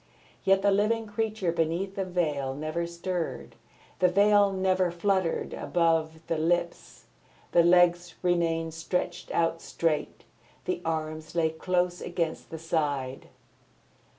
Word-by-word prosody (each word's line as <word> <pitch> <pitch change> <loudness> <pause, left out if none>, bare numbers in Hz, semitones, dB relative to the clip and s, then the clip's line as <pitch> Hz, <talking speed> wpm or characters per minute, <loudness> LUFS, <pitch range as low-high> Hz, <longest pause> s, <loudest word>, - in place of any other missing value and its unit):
Yet 195 0 +3
the 200 - +4
living 215 +3 +2
creature 215 -3 -1
beneath 170 +4 -1
the 195 - -1
veil 150 -7 -1
never 155 +3 -3
stirred. 170 - -4 0.4
The 185 - +5
veil 200 +2 +4
never 185 -1 +1
fluttered 180 0 0
above 165 -1 0
the 165 - -1
lips, 170 +2 -1 0.5
the 170 - +6
legs 175 0 +4
remained 165 -2 +1
stretched 175 +2 -3
out 165 0 0
straight, 160 -3 -2 0.4
the 365 -1 -2
arms 155 0 -3
lay 160 -2 +2
close 180 +2 -1
against 170 -2 -3
the 165 - -6
side. 145 -5 -2
170 Hz, 125 wpm, -28 LUFS, 160-185 Hz, 0.5 s, the